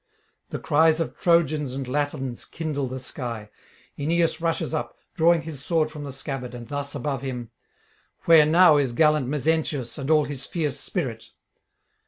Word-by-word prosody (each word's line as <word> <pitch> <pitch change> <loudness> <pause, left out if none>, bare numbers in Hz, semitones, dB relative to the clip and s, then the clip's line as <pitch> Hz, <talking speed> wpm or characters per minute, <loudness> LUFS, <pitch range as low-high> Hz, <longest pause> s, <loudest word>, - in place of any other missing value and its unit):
The - - -4
cries 160 +1 +3
of 165 - -2
Trojans 155 -5 +2
and 135 -1 -4
Latins 135 -2 -2
kindle 150 -4 -3
the 130 +1 -5
sky. 120 -4 -6 0.5
Aeneas 165 +2 +1
rushes 165 -1 -1
up, 155 - -3 0.2
drawing 170 -1 +3
his 150 -4 -8
sword 155 -1 +1
from 150 -2 -7
the 140 - -6
scabbard, 135 -2 -5
and 120 -1 -8
thus 145 +1 -4
above 135 -1 -2
him: 125 -4 -5 0.7
'Where 160 -3 +7
now 165 -1 +6
is 135 -4 +1
gallant 150 -1 +3
Mezentius 150 -3 -1
and 135 +1 -4
all 155 -2 +4
his 140 -2 -5
fierce 150 -5 -2
spirit?' 130 - -4
145 Hz, 160 wpm, -25 LUFS, 130-160 Hz, 0.7 s, Where